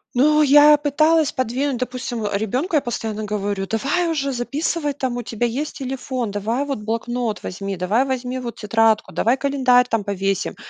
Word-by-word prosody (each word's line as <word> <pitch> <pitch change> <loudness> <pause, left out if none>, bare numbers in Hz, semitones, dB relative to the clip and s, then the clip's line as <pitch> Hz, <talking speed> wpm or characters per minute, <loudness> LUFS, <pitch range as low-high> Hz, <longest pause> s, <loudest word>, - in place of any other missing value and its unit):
Ну, 300 +4 +4
я 295 +1 +7
пыталась 305 +1 +2
подвинуть, 255 +2 -1
допустим, 245 -2 -4
ребёнку 220 - -2
я 295 - +4
постоянно 220 -3 -4
говорю: 205 -1 -2
"Давай 280 - 0
уже 280 -4 -1
записывай, 290 +4 -2
там 260 -3 -3
у - - -2
тебя 230 +1 -2
есть 280 +6 -4
телефон, 260 -3 -4
давай 220 +6 -1
вот 275 -5 -3
блокнот 230 +1 -3
возьми, 195 +1 -4
давай 205 +9 +1
возьми 255 -1 -3
вот 240 -3 -6
тетрадку, 225 0 +1
давай 240 +4 +2
календарь 260 -3 +3
там 225 -2 0
повесим". 195 -1 -2
245 Hz, 165 wpm, -21 LUFS, 220-280 Hz, -, я